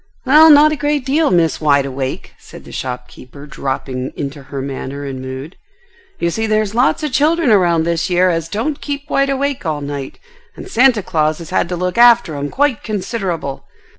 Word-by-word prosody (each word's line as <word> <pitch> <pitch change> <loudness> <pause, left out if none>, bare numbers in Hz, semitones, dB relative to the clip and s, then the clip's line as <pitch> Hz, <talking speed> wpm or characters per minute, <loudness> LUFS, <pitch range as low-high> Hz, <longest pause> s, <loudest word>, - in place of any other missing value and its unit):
"Well, 305 +4 +7
not 300 0 +7
a - - 0
great 290 -2 -1
deal, 300 +3 +2
Miss 170 -3 +1
Wide 140 -2 +3
awake," 130 -1 -5
said - - -13
the - - -12
shopkeeper 125 +2 -8
dropping 135 -2 -4
into 145 0 -5
her 140 +1 -7
manner 135 +1 -5
and 135 -2 -6
mood. 130 +6 -8 0.6
"You 170 - -1
see 225 +5 -2
there's 215 -1 0
lots 245 +6 +1
of 300 - -2
children 305 0 +2
around 175 -5 +3
this 170 +1 -1
year 180 +1 +3
as 165 -1 -3
don't 275 - -3
keep 285 0 -5
wide 275 0 +2
awake 275 0 -2
all 155 -4 -2
night, 140 -1 -6 0.4
and - - -10
Santa 250 - +3
Claus 155 -3 0
has 165 -2 -10
had 170 - 0
to 180 - -2
look 180 +4 -2
after 240 -7 +5
'em 145 0 -4
quite 280 - 0
considerable. 190 - -4
175 Hz, 190 wpm, -17 LUFS, -, 0.6 s, Well